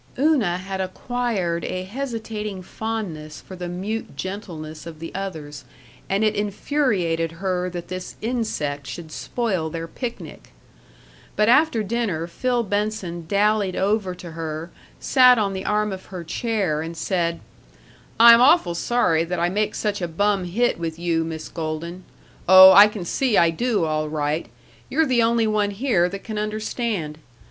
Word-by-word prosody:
Una 260 - +2
had 190 +1 -4
acquired 190 -3 -2
a 185 0 -3
hesitating 215 -3 -5
fondness 185 -9 -5
for 190 - -11
the 180 -1 -6
mute 190 -1 -5
gentleness 165 -5 -6
of 165 -2 -9
the 165 +1 -8
others, 160 -8 -6 0.5
and 195 +2 +1
it 215 - +3
infuriated 200 - 0
her 180 +1 -2
that 175 -1 -7
this 185 0 -6
insect 180 - -2
should 155 +6 -8
spoil 190 -9 -2
their 165 +1 -5
picnic. 240 +6 -7 0.8
But 210 +1 +3
after 260 -3 +4
dinner 205 -7 -1
Phil 245 +7 -1
Benson 205 -5 -3
dallied 205 0 +2
over 195 -2 0
to 175 -2 -10
her, 160 +1 -5 0.3
sat 250 -2 +6
on 200 -3 0
the 190 0 -5
arm 210 0 +1
of 190 -1 -7
her 180 -3 -7
chair, 190 -4 -1
and 165 +1 -6
said: 170 -2 -1 0.8
"I'm 235 0 +9
awfully 270 - +5
sorry 170 -4 +1
that 180 +1 -3
I 175 +1 +2
make 210 +3 -1
such 205 -2 -2
a 175 - -1
bum 195 +3 0
hit 220 +4 0
with 165 -1 -4
you, 170 -1 0
Miss 160 -1 -6
Golden. 170 +2 -5 0.4
Oh, 190 0 +11
I 205 +2 +9
can 210 -4 -6
see 245 +4 +1
I 170 -1 +5
do, 210 0 0
all 155 -1 -1
right. 150 +1 -2 0.4
You're 320 - +2
the 255 -4 +2
only 230 0 +2
one 215 -1 +1
here 200 -5 +1
that 195 +1 -7
can 215 -2 -4
understand. 215 -6 -3
190 Hz, 155 wpm, -23 LUFS, 170-220 Hz, 0.8 s, Oh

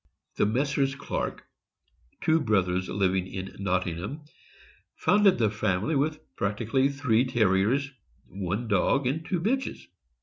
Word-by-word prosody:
The - - +3
Messrs. 135 +3 0
Clark, 140 - -4 0.8
two 160 0 +3
brothers 95 -5 +1
living 95 -1 +1
in 95 0 -7
Nottingham, 95 - -2 0.7
founded 205 -2 +4
the 110 -3 +2
family 105 - 0
with 150 +2 0 0.2
practically 115 +7 +1
three 130 -5 +2
Terriers 120 +3 +2 0.3
— 65 - -38
one 100 +4 -3
dog 125 +6 +2
and 145 +6 -1
two 180 +2 -1
bitches. 260 +9 -1
115 Hz, 125 wpm, -27 LUFS, 95-140 Hz, 0.8 s, founded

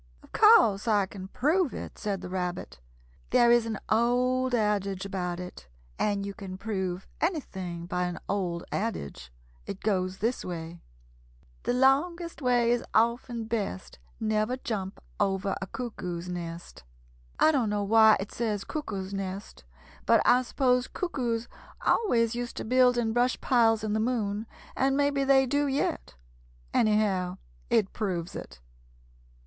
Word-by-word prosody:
"Of - - -19
course 235 - +5
I 205 -3 +3
can 190 0 -9
prove 305 - +1
it," - - -7
said 200 -3 -2
the - - -7
Rabbit. 180 - -4 0.5
"There 235 0 +5
is 240 -1 +4
an 220 -2 -2
old 250 +3 +2
adage 200 -3 0
about 180 -3 -3
it, 180 - -9 0.3
and 200 -1 0
you 200 - -5
can 190 -1 -8
prove 190 -3 -3
anything 190 - -3
by 180 0 -1
an 180 -1 -4
old 180 -4 -2
adage. 135 - -4 0.4
It 200 - -6
goes 185 -3 0
this 230 +5 -1
way: 170 -1 -6 0.8
"The - - +1
longest 320 +7 +2
way 245 -2 +3
is 240 0 +1
often 235 +1 +1
best 215 - -4 0.2
Never 215 +3 0
jump 200 -6 -4 0.2
over 195 -1 0
a 190 - -4
cuckoo's 180 -8 -5
nest. 170 - -7 0.6
"I 315 - +6
don't 255 -8 +1
know 205 0 0
just 200 - -5
why 220 -1 +7
it 195 +2 -5
says 215 -4 -2
'cuckoo's 200 -11 -5
nest,' 195 0 -5 0.4
but - - +6
I 250 +1 +6
suppose 250 0 +1
cuckoos 240 -9 -2 0.4
always 230 - +2
used 240 0 -5
to - - -4
build 250 +1 +4
in 225 -2 0
brush 245 +2 +2
piles 225 -4 +3
in 215 -1 -1
the 215 - +1
moon, 220 -2 -1 0.3
and 270 +1 +2
maybe 285 -1 +2
they 270 0 +5
do 285 +3 +1
yet. 265 - -2 0.6
Anyhow 200 -4 +2 0.3
it 195 - +2
proves 180 -6 -3
it." - - -9
215 Hz, 150 wpm, -28 LUFS, 190-245 Hz, 0.8 s, why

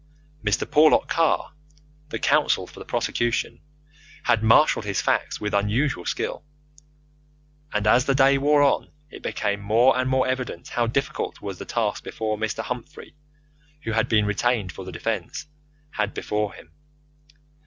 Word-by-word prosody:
Mr. 105 -2 +1
Porlock 155 +1 +5
Carr, 165 -1 +1 0.6
the - - -3
counsel - - +2
for - - -14
the - - -9
prosecution, 120 -1 -1 0.6
had 115 - +2
marshalled 115 +3 +4
his 100 -3 -2
facts - - 0
with 105 0 -3
his 100 0 +2
usual 120 -3 0
skill, - - -3 1.3
and 105 -1 -1
as 125 +4 +4
the 135 - +2
day 135 0 +5
wore 145 +1 +4
on, 140 - +2 0.2
it - - -10
became 100 -1 -2
more 115 +6 +4
and 130 0 0
more 130 0 +2
evident 130 -9 -3
how 120 -1 0
difficult 135 +3 -2
was - - -6
the - - -6
task - - -1
which - - -9
Mr. 110 0 -2
Humphrey, 125 +4 -7 0.7
who 115 - -3
had 110 0 +1
been 105 -2 +3
retained 105 -1 0
for 95 - -9
the 95 - -7
defence, 110 - -4 0.5
had 105 -4 -2
before 105 -1 -2
him. 80 - -15
115 Hz, 155 wpm, -24 LUFS, 105-130 Hz, 1.3 s, Porlock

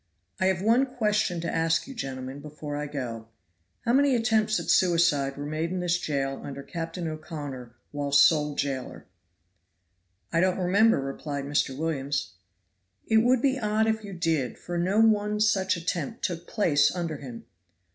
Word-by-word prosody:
"I 185 - +2
have 190 -1 0
one 235 +5 +4
question 210 -8 0
to 170 - -3
ask 165 +4 +1
you, 270 - -7
gentlemen, 135 - -6
before 150 0 -7
I 150 0 -3
go: 120 -6 -5 0.6
How 235 - +2
many 275 0 +4
attempts 220 -2 +2
at - - -1
suicide 165 -7 +3
were 145 - -5
made 155 +3 -2
in 185 +1 -3
this 175 -1 +1
jail 135 -4 -2
under 140 -1 -7
Captain 165 +1 -5
O'Connor 150 -6 -6 0.2
while 145 -1 -3
sole 150 +1 +5
jailer?" 135 -3 -3 1.3
"I 165 - +3
don't 185 +1 +2
remember," 200 +4 +3
replied 140 +1 -4
Mr. 140 -2 0
Williams. 140 - -2 0.7
"It 220 - +3
would 245 +2 +3
be 270 -1 +2
odd 215 -1 +1
if 220 0 0
you 200 -1 -7
did, 165 -8 -1
for 175 - -6
no 185 +5 +1
one 210 -1 +3
such 190 -4 +2
attempt 175 +7 -3
took 175 -2 -4
place 165 -10 +3
under 165 -4 -3
him. 125 -4 -9
170 Hz, 165 wpm, -27 LUFS, 145-210 Hz, 1.3 s, sole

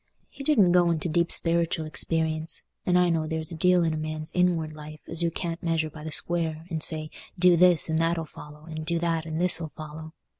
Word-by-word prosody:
He 275 - -10
didn't 220 -12 +3
go 175 -1 +3
into 165 0 -1
deep 170 +1 +1
speritial 165 -1 +1
experience; 160 0 -1 0.2
and 180 0 +3
I 180 -1 +3
know 160 -2 -1
there 160 0 -3
s 160 +2 -6
a - - -6
deal 180 +2 +2
in 165 -1 0
a - - -3
man's 155 0 -5
inward 170 -3 0
life 150 0 -11
as 165 - -4
you 170 - +1
can't 170 0 -5
measure 165 -2 -1
by 150 0 -11
the 160 - -6
square, 165 -1 0
and 160 -1 -3
say, 155 -1 +3 0.3
'Do 180 0 +5
this 175 -1 +5
and 160 0 -1
that 165 +1 0
'll 165 - -3
follow,' 150 0 -13
and, 155 -1 -7
'Do 170 +2 -2
that 165 -1 -2
and 160 0 -4
this 175 -1 +4
'll 160 - -5
follow. 155 0 -9
165 Hz, 235 wpm, -25 LUFS, 155-170 Hz, 0.3 s, Do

